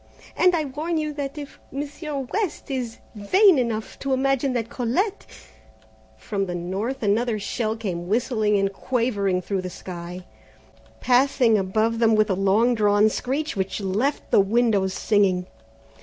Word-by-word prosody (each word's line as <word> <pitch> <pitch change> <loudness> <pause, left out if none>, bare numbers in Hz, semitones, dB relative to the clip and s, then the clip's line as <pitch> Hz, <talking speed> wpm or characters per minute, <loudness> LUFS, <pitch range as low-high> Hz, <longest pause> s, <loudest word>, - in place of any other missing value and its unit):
And 360 -1 +4
I 315 -2 0
warn 305 +5 -3
you 305 -1 -2
that 285 0 -5
if 290 -2 -8
Monsieur 290 +1 -5
West 345 - -3
is 245 -4 -3 0.2
vain 335 - +4
enough 225 -3 -3
to 275 -1 -1
imagine 270 0 +1
that 230 -2 -1
Colette 315 - -2 0.5
" - - -31
From 195 -2 -1
the 175 - -4
north 195 +9 -3
another 220 +2 +1
shell 220 +2 -2
came 175 -6 -4
whistling 215 -1 +1
and 195 0 0
quavering 200 -7 -1
through 195 0 -2
the 185 - -5
sky, 180 0 -8 0.8
passing 250 -2 +3
above 215 +4 0
them 225 -1 +4
with 215 -1 +2
long 195 +6 +3
drawn 210 -1 +3
screech 285 +7 -2
which 190 +1 -2
left 210 +9 -1
the - - +6
windows 200 -2 +1
singing. 195 -4 +2
225 Hz, 150 wpm, -24 LUFS, 200-270 Hz, 0.8 s, the